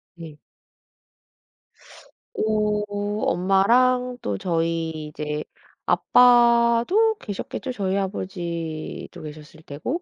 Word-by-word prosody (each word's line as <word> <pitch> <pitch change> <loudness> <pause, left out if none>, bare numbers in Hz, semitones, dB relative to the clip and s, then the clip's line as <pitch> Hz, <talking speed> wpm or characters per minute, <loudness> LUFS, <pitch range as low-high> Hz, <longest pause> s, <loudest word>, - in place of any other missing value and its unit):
네. 160 -3 -10 2.0
어. 215 - 0 0.4
엄마랑 245 +7 +2
또 - - -2
저희 165 -3 -2
이제 150 0 -4 0.4
아빠도 240 - +4
계셨겠죠. 210 +5 -5
저희 195 -5 -1
아버지도 170 -5 -5
계셨을 155 +1 -11
테고 205 - -4
195 Hz, 170 characters per minute, -23 LUFS, 165-240 Hz, 2.0 s, 아빠도